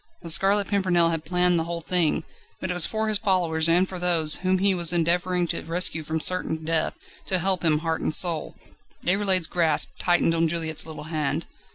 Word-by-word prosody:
The 165 Hz, -, +1 dB
Scarlet 200 Hz, +4 st, +3 dB
Pimpernel 185 Hz, -4 st, +2 dB
had 165 Hz, -1 st, -4 dB
planned 180 Hz, +1 st, +1 dB
the 165 Hz, -, -3 dB
whole 170 Hz, 0 st, -5 dB
thing, 170 Hz, -2 st, 0 dB, 0.4 s
but 185 Hz, -, -4 dB
it -, -, -1 dB
was 175 Hz, -2 st, +5 dB
for 220 Hz, 0 st, -3 dB
his 215 Hz, -2 st, 0 dB
followers 170 Hz, -6 st, 0 dB
and 180 Hz, +3 st, +3 dB
for 185 Hz, -1 st, -7 dB
those, 165 Hz, -3 st, +2 dB
whom 185 Hz, +1 st, 0 dB
he 195 Hz, +1 st, +1 dB
was 170 Hz, -2 st, +2 dB
endeavouring 175 Hz, +1 st, 0 dB
to -, -, -3 dB
rescue 165 Hz, 0 st, 0 dB
from 160 Hz, +1 st, -4 dB
certain 160 Hz, -2 st, 0 dB
death, 160 Hz, 0 st, -1 dB, 0.3 s
to 185 Hz, -, +1 dB
help 185 Hz, -1 st, 0 dB
him 155 Hz, -2 st, +2 dB
heart 160 Hz, 0 st, -2 dB
and -, -, -1 dB
soul. 170 Hz, -3 st, +2 dB, 0.5 s
Déroulède's 190 Hz, -1 st, +2 dB
grasp 160 Hz, -3 st, +1 dB
tightened 175 Hz, -2 st, +1 dB
on 165 Hz, 0 st, +1 dB
Juliette's 160 Hz, -1 st, -2 dB
little 160 Hz, -1 st, -9 dB
hand. 155 Hz, -2 st, -3 dB
175 Hz, 200 wpm, -24 LUFS, 160-185 Hz, 0.5 s, was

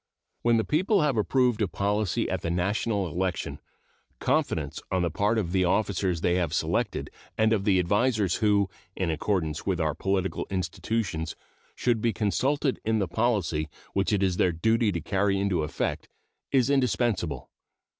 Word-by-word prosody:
When 120 Hz, -1 st, +3 dB
the 110 Hz, -, +2 dB
people 185 Hz, -, +2 dB
have 145 Hz, -4 st, +2 dB
approved 120 Hz, +1 st, +2 dB
a 105 Hz, -, +2 dB
policy 100 Hz, +1 st, 0 dB
at -, -, -3 dB
a 85 Hz, -, -1 dB
national 100 Hz, +3 st, 0 dB
election, 90 Hz, +2 st, -2 dB, 0.6 s
confidence -, -, 0 dB
on 95 Hz, -1 st, +1 dB
the 85 Hz, -, 0 dB
part 100 Hz, +8 st, +1 dB
of 90 Hz, -6 st, -1 dB
the 95 Hz, 0 st, +2 dB
officers 95 Hz, -2 st, +1 dB
they 90 Hz, +1 st, +2 dB
have 85 Hz, -3 st, 0 dB
selected -, -, -1 dB, 0.3 s
and 110 Hz, 0 st, +3 dB
of 100 Hz, -3 st, 0 dB
the 100 Hz, -3 st, +4 dB
advisers 100 Hz, +1 st, +2 dB
who, 105 Hz, -3 st, +3 dB, 0.3 s
in 90 Hz, -3 st, -1 dB
accordance 80 Hz, -2 st, -1 dB
with -, -, +1 dB
our -, -, +1 dB
political 95 Hz, 0 st, -1 dB
institutions, 90 Hz, -2 st, -2 dB, 0.4 s
should 120 Hz, -3 st, +1 dB
be 115 Hz, -1 st, +1 dB
consulted 130 Hz, -, 0 dB
in 110 Hz, 0 st, +1 dB
the 100 Hz, -3 st, 0 dB
policy 85 Hz, -7 st, 0 dB, 0.2 s
which 100 Hz, +2 st, +1 dB
it 100 Hz, -2 st, +2 dB
is 90 Hz, -2 st, +1 dB
their 90 Hz, -, +3 dB
duty 110 Hz, +6 st, +2 dB
to 85 Hz, -3 st, -3 dB
carry 100 Hz, +3 st, +1 dB
into 100 Hz, -4 st, +1 dB
effect 75 Hz, -, -3 dB, 0.4 s
is 135 Hz, -1 st, +3 dB
indispensable. 120 Hz, -, 0 dB
100 Hz, 165 wpm, -27 LUFS, 90-110 Hz, 0.6 s, the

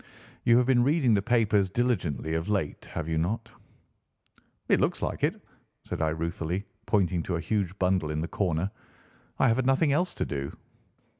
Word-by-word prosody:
You 120 Hz, 0 st, +6 dB
have 125 Hz, -, +4 dB
been 125 Hz, -1 st, +4 dB
reading 140 Hz, -3 st, +3 dB
the 100 Hz, -, +3 dB
papers 105 Hz, -4 st, +2 dB
diligently 90 Hz, -, -1 dB
of 80 Hz, +4 st, -2 dB
late, 95 Hz, -8 st, -1 dB
have 80 Hz, -2 st, -3 dB
you 80 Hz, -1 st, 0 dB
not?" 110 Hz, +7 st, -2 dB, 1.2 s
"It -, -, +3 dB
looks -, -, 0 dB
like -, -, -3 dB
it," -, -, +1 dB, 0.5 s
said -, -, -4 dB
I 80 Hz, -, +2 dB
ruefully, 85 Hz, +4 st, -3 dB, 0.2 s
pointing 95 Hz, -4 st, +2 dB
to 90 Hz, -, -2 dB
a -, -, -1 dB
huge 100 Hz, -1 st, -1 dB
bundle 90 Hz, -4 st, +1 dB
in 75 Hz, 0 st, -2 dB
the 85 Hz, -, -2 dB
corner. 90 Hz, 0 st, -1 dB, 0.7 s
"I -, -, +3 dB
have 115 Hz, 0 st, +3 dB
had 130 Hz, -1 st, 0 dB
nothing 140 Hz, +3 st, +3 dB
else 180 Hz, +5 st, 0 dB
to -, -, -1 dB
do." 70 Hz, -1 st, -4 dB
95 Hz, 180 wpm, -28 LUFS, 80-120 Hz, 1.2 s, You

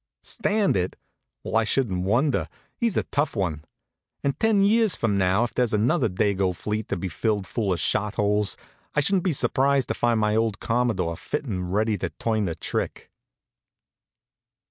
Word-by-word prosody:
Stand 210 Hz, -3 st, +1 dB
it? 90 Hz, -1 st, -1 dB, 0.5 s
Well, -, -, -4 dB
I 115 Hz, -, +4 dB
shouldn't 105 Hz, -6 st, 0 dB
wonder. 125 Hz, +8 st, +1 dB, 0.3 s
He's 230 Hz, -5 st, 0 dB
a -, -, +2 dB
tough 145 Hz, -1 st, -1 dB
one. 85 Hz, -7 st, -2 dB, 0.6 s
And 140 Hz, +1 st, -1 dB
ten 220 Hz, -3 st, +3 dB
years 220 Hz, 0 st, +4 dB
from 110 Hz, -3 st, 0 dB
now, 95 Hz, +3 st, +2 dB
if 120 Hz, -, -3 dB
there's 120 Hz, -3 st, +1 dB
another 120 Hz, +4 st, +2 dB
Dago 95 Hz, -1 st, 0 dB
fleet 105 Hz, +3 st, -3 dB
to -, -, -1 dB
be 95 Hz, -, -3 dB
filled 100 Hz, +4 st, -1 dB
full 100 Hz, +1 st, -2 dB
of 90 Hz, -, 0 dB
shot 105 Hz, +7 st, 0 dB
holes, 105 Hz, 0 st, +1 dB, 0.4 s
I 150 Hz, -, +4 dB
shouldn't 185 Hz, +4 st, +1 dB
be 185 Hz, -, +3 dB
surprised 135 Hz, 0 st, +2 dB
to -, -, +1 dB
find 120 Hz, -2 st, +1 dB
my 105 Hz, 0 st, +2 dB
old 110 Hz, -2 st, 0 dB
Commodore 115 Hz, -8 st, 0 dB
fit 150 Hz, 0 st, -4 dB
and 90 Hz, -7 st, -3 dB
ready 105 Hz, 0 st, +1 dB
to -, -, -2 dB
turn 110 Hz, -2 st, -1 dB
the 85 Hz, -3 st, -2 dB
trick. -, -, -4 dB
110 Hz, 175 wpm, -25 LUFS, 95-135 Hz, 0.6 s, I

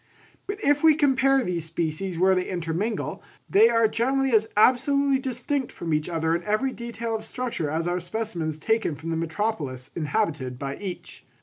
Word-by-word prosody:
But 400 Hz, +1 st, -3 dB
if 290 Hz, +1 st, +3 dB
we 315 Hz, -2 st, +7 dB
compare 270 Hz, -2 st, +3 dB
these 175 Hz, -5 st, -2 dB
species 165 Hz, +2 st, -3 dB
where 190 Hz, +2 st, +4 dB
they 185 Hz, -1 st, -1 dB
intermingle, 180 Hz, +5 st, -2 dB, 0.3 s
they 220 Hz, +4 st, +6 dB
are 230 Hz, -1 st, +4 dB
generally 265 Hz, +4 st, +1 dB
as 220 Hz, -1 st, +4 dB
absolutely 270 Hz, +4 st, +4 dB
distinct 260 Hz, +1 st, -2 dB
from 165 Hz, -2 st, -4 dB
each 150 Hz, +2 st, 0 dB
other 165 Hz, -1 st, 0 dB
in 170 Hz, -, -3 dB
every 215 Hz, +6 st, 0 dB
detail 235 Hz, -1 st, -4 dB
of 215 Hz, -, -4 dB
structure 230 Hz, -, -3 dB
as 160 Hz, +2 st, -1 dB
are 175 Hz, +1 st, 0 dB
specimens 175 Hz, -4 st, -3 dB
taken 220 Hz, 0 st, 0 dB
from 160 Hz, +3 st, -6 dB
the -, -, 0 dB
metropolis 160 Hz, -, -3 dB
inhabited 150 Hz, -, -1 dB
by 140 Hz, +1 st, -4 dB
each. 190 Hz, -3 st, -7 dB
205 Hz, 175 wpm, -25 LUFS, 165-245 Hz, 0.3 s, we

